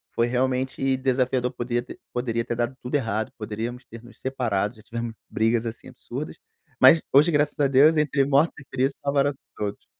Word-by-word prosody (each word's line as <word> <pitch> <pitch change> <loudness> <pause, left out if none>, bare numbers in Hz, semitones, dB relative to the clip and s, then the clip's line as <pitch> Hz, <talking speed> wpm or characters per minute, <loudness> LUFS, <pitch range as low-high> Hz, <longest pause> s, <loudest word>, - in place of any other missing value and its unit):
foi 115 - +2
realmente 130 +1 0
desafiador 130 -1 +1
poder 120 -1 -2 0.3
poderia 115 -2 -1
ter - - -2
dado 120 +2 -1
tudo 125 - -7
errado, 110 -5 -1
poderíamos 115 +3 -5
ter 115 +1 -12
nos 120 - -16
separado, 120 -5 -1
já 110 - -17
tivemos 115 0 -4 0.2
brigas, 115 +1 +1
assim, 115 0 -6
absurdas, - - -7 0.4
mas 160 - +8
hoje 150 +5 +6
graças 150 -1 +1
a 145 - +4
Deus 140 +4 +5
entre 150 -2 +2
mortos 145 +4 +3
e 145 - -13
feridos 135 +2 0
salvaram-se 140 0 +1 0.2
todos. 105 -1 -4
125 Hz, 175 wpm, -25 LUFS, 115-135 Hz, 0.4 s, mas